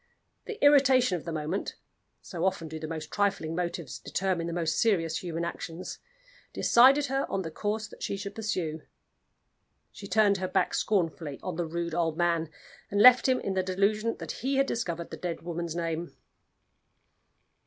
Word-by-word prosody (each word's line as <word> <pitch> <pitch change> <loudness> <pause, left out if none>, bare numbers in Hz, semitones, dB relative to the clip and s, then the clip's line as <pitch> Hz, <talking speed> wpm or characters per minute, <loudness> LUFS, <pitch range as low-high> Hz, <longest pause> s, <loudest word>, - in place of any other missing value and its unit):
The 445 - -6
irritation 265 -7 +5
of 170 - -6
the 165 - -4
moment 160 +4 -3 0.5
so 175 -3 -5
often 190 -3 0
do 160 0 -7
the 155 - -5
most 155 -1 -6
trifling 195 -6 0
motives 175 0 -4
determine 185 -3 -1
the - - -3
most 165 -2 -1
serious 165 -8 +2
human 170 -1 -3
actions 170 +1 -6 0.5
decided 270 +4 +5
her 270 +1 -1
on 190 - -1
the 160 - -6
course 215 +5 -2
that - - -15
she 200 - -2
should 200 0 -6
pursue. 180 -8 -3 1.1
She 200 - -10
turned 205 -1 +3
her 185 0 -2
back 185 - +1
scornfully 165 -7 -1
on 180 -3 -4
the 170 0 -2
rude 170 0 -3
old 165 -2 0
man, 170 -2 +1 0.4
and 200 - 0
left 250 +3 +8
him 255 - +3
in 195 - -2
the 190 - +1
delusion 200 +4 0
that - - -6
he 270 +4 -2
had 275 0 +3
discovered 170 -10 -3
the - - -6
dead 175 -3 -4
woman's 170 -1 -4
name. 170 0 -3
180 Hz, 175 wpm, -28 LUFS, 165-210 Hz, 1.1 s, left